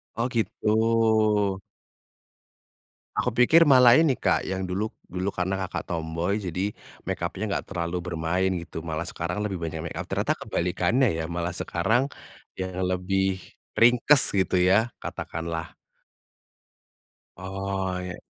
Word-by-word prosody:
Oh, 115 +2 0
gitu. 110 -3 +2 1.6
Aku 125 -2 0
pikir 160 +7 +6
malah 125 -1 +7
ini, 155 -5 +3
Kak, - - 0
yang 95 0 -2
dulu 95 +4 -2 0.2
dulu 90 +2 -3
karena 95 +2 -1
Kakak 95 -2 -3
tomboy 85 +4 -2
jadi 95 +1 -2 0.3
make 95 0 -3
up-nya 85 +4 -3
enggak - - -2
terlalu 85 -1 -3
bermain 90 +1 -1
gitu. 85 -1 -6
Malah 80 0 -4
sekarang 90 +3 -4
lebih 100 -4 -3
banyak 80 -1 -4
make 85 - -6
up - - -5
ternyata - - -1
kebalikannya 105 +7 +1
ya, 80 - -3
malah 85 +1 -3
sekarang 110 +9 0 0.5
yang 95 0 -4 0.2
lebih 95 +1 0 0.3
ringkes 125 +4 +5
gitu 95 - +1
ya 95 +5 +4 0.2
katakanlah. 80 0 -5 1.6
Oh, 95 0 -3
ya. 90 0 -5
95 Hz, 130 wpm, -26 LUFS, 85-110 Hz, 1.6 s, malah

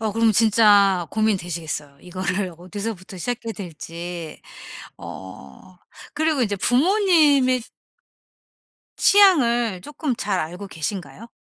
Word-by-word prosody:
어 220 -2 -2
그럼 225 0 +3
진짜 205 -4 +4
고민되시겠어요. 170 -9 -2
이거를 185 0 -3
어디서부터 190 +1 -7
시작해야 230 +2 -4
될지. 170 -2 -8 0.6
어 95 - -11 0.4
그리고 310 -3 0
이제 205 -4 0
부모님의 290 - +3 1.4
취향을 240 - +4
쪼끔 295 - -3
잘 195 -4 -1
알고 180 +5 -6
계신가요? 175 +4 -6
205 Hz, 250 characters per minute, -22 LUFS, 175-240 Hz, 1.4 s, 진짜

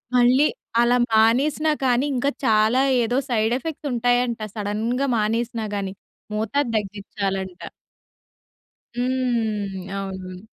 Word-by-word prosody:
మళ్ళీ 250 +4 +5 0.4
అలా 240 +1 +4 0.2
మానేసినా 265 +8 +3
కానీ 250 +1 +2
ఇంకా 255 +3 +1 0.2
చాలా 220 +2 +4 0.2
ఏదో 240 +2 0
సైడ్ 220 -1 +1
ఎఫెక్ట్స్ 300 +1 -5
ఉంటాయంట. 245 0 +1 0.2
సడెన్‌గా 220 +6 -1
మానేసినా 225 +1 -1
కానీ. 195 -1 -3 0.4
మోతాదు 230 +6 0
తగ్గించాలంట. 195 -2 -4 1.4
హ్మ్. 225 -7 -1
అవునవును. 190 -2 -6
230 Hz, 95 wpm, -23 LUFS, 205-250 Hz, 1.4 s, మళ్ళీ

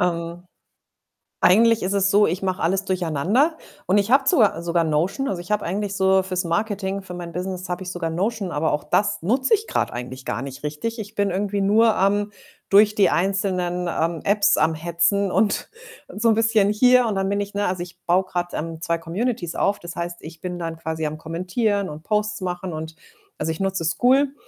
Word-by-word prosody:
Ähm, 170 0 -2 1.0
eigentlich 225 +6 +5
ist 190 +2 -1
es 195 -1 +2
so, 205 +1 +5
ich 180 +4 -2
mache 185 -1 -2
alles 190 +3 +1
durcheinander 185 - +1 0.3
und 195 +3 +3
ich 200 - -1
habe 270 +1 +4
sogar 205 -10 +3
sogar 170 0 +1
Notion. 175 - 0
Also, 180 -7 -3
ich 175 - -9
habe 210 -1 0
eigentlich 200 +3 -2
so 190 -1 +3
fürs 185 -1 -2
Marketing 195 +2 -2
für 180 - -9
mein 175 -1 -7
Business, 185 +1 -5
habe 180 +1 -3
ich 180 - -5
sogar 175 -2 -3
Notion, 195 +3 -2
aber 160 +1 0
auch 150 - -1
das 205 0 +1
nutze 255 - +1
ich 435 +1 +1
grad - - -1
eigentlich 125 +1 -7
gar 110 - -3
nicht 135 +1 -8
richtig. 155 +11 -4
Ich 210 0 -7
bin 200 -1 +1
irgendwie 200 +2 -1
nur 220 +3 +4
am 205 +2 +1 0.4
durch 210 +1 +5
die 205 - +4
einzelnen, 180 -1 0
ähm, 165 -1 -1
Apps 200 0 +3
am 160 - +2
Hetzen 170 +5 +1
und 210 +1 +1 0.4
und 205 - -9
so 230 - +4
'n 220 - +4
bisschen 225 -2 +3
hier 250 +3 +5
und 215 - -1
dann 195 0 0
bin 200 0 0
ich, 200 0 -6
ne 205 0 -1
also 180 -1 -2
ich 175 - -13
baue 180 +2 +3
grad, 175 -1 -4
ähm, 165 0 -5
2 170 0 0
Communities 175 +2 -3
auf. 200 +1 +1
Das 175 0 -8
heißt, 175 0 -4
ich 160 +1 -10
bin 180 -1 -4
dann 165 -1 -4
quasi 160 -1 -4
am 150 +1 -3
Kommentieren 185 +5 -1
und 150 +1 -9
Posts 210 0 -1
machen 180 0 -4
und 160 +1 -6 0.4
also, 155 +1 -1
ich 160 - -6
nutze 190 -3 -1
Skool. 265 - +3
190 Hz, 210 wpm, -22 LUFS, 170-205 Hz, 1.0 s, eigentlich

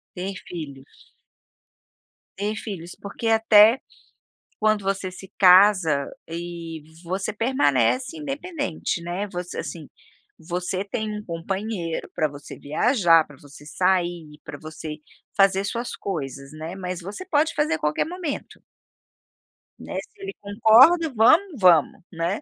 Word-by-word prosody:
Ter 190 +2 -4
filhos. 140 -6 -10 1.2
Ter 205 +2 -2
filhos, 185 -6 -7
porque 200 +3 -5
até, 225 +1 +6 0.8
quando 215 -2 +2
você 195 -1 -1
se 190 +1 -12
casa, 185 -6 +5 0.2
eh, 165 - -5 0.7
você 190 +5 -2
permanece 245 - +1
independente, 290 - -4
né. 175 +4 -3
Você 180 0 -5
assim, 160 -4 -6 0.5
você 180 +3 -3
tem 215 +1 -3
um 210 - -9
companheiro 175 0 -4
pra 155 - +1
você 145 0 -10
viajar, 165 - +3
pra 145 - -15
você 145 +1 -15
sair, 175 -3 -1
pra - - -8
você, 155 -1 -7 0.4
fazer 195 0 +4
suas 235 +4 -3
coisas, 140 -7 -5
né, 160 +3 -7
mas 180 -2 -5
você 200 - -8
pode 320 -1 +2
fazer 295 - +1
a - - -2
qualquer 150 0 0
momento 340 -4 -6 1.2
Né, - - -8
se 405 - -19
ele 390 0 -5
concorda, 235 +11 +5
vamos, 305 - +4
vamos, 180 -1 +4
né. 170 +4 -2
190 Hz, 125 wpm, -24 LUFS, 165-225 Hz, 1.2 s, até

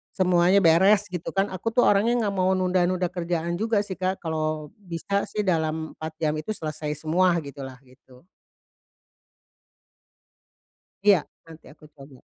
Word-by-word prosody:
semuanya 180 0 +3
beres 190 +5 +5
gitu 175 -2 -4
kan 195 - +3
aku 190 +4 -3
tuh 245 - +5
orangnya 210 +4 +3
enggak 205 - -1
mau 185 +1 +2
nunda-nunda 185 0 +1
kerjaan 170 -1 -2
juga 220 -2 +1
sih 190 - -5
Kak 185 +1 -1
kalau 155 -1 -3
bisa 195 +3 -3
sih 210 -1 -2
dalam 160 -3 -1
4 160 0 -6
jam 155 -2 0
itu 155 - -9
selesai 155 -1 -5
semua 175 +3 +2
gitulah 135 -2 -8
gitu. 130 0 -20 2.8
Iya, 200 -4 +7 0.3
nanti 165 -1 -14
aku 150 - -19
coba. 135 -2 -14
175 Hz, 140 wpm, -25 LUFS, 155-190 Hz, 2.8 s, Iya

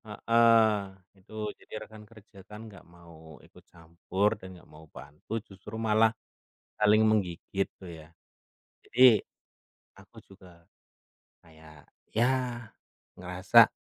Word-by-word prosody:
Heeh. 115 0 +3 0.4
Itu, 95 +2 -20 0.3
jadi - - -18
rekan 110 -1 -14
kerja 105 -3 -18
kan 105 0 -10
nggak 100 -4 -14
mau 80 -3 -15
ikut - - -20
campur 85 +4 -2
dan 95 - -11
nggak - - -20
mau 80 +1 -14
bantu, 75 +6 -15
justru 100 +3 -11
malah 110 0 +3 0.7
saling 105 0 +4
menggigit 95 -2 -1
tuh, 95 - -11
ya. 80 -2 -11 0.8
Jadi, 125 - -3 1.0
aku - - -20
juga 90 -3 -18 0.8
kayak, 80 -2 -18 0.2
ya, 120 0 -1 0.5
ngerasa 90 +1 +4
100 Hz, 115 wpm, -28 LUFS, 85-110 Hz, 1.0 s, saling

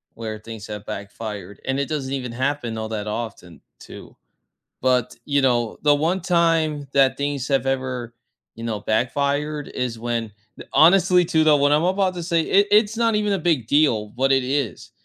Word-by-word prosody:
where 110 -1 -6
things 110 -1 -9
have 105 -1 -7
backfired, 100 -1 -7
and 135 +1 -1
it 140 - -1
doesn't 140 -4 -3
even 125 -3 -3
happen 130 -3 -2
all 110 0 -4
that 105 -1 -4
often 105 -6 -6 0.2
too. - - -12 0.7
But, 125 -1 +1
you 140 -1 +1
know, 120 -4 +1
the 145 -1 +5
one 165 +6 0
time 165 -5 +1
that 135 -1 +3
things 140 -2 -2
have 135 -1 +1
ever, 130 -3 -3 0.4
you 115 - -9
know, 110 -3 -3
backfired 140 +7 -1
is 120 -3 -4
when, 115 -2 -3 0.3
eh - - -7
honestly 180 +2 +5
too, 160 -1 +2
though, 150 -2 +5
what 145 +1 +3
I'm 150 +3 +3
about 185 0 +1
to 175 - -5
say, 170 -1 +1
it 200 +5 +3
it's 215 +1 +4
not 230 -1 +2
even 210 -1 +1
a 195 - 0
big 155 -11 0
deal 115 -8 +2
what 135 +2 +1
it 135 -1 +3
is, 135 -2 -3
135 Hz, 185 wpm, -22 LUFS, 115-155 Hz, 0.7 s, the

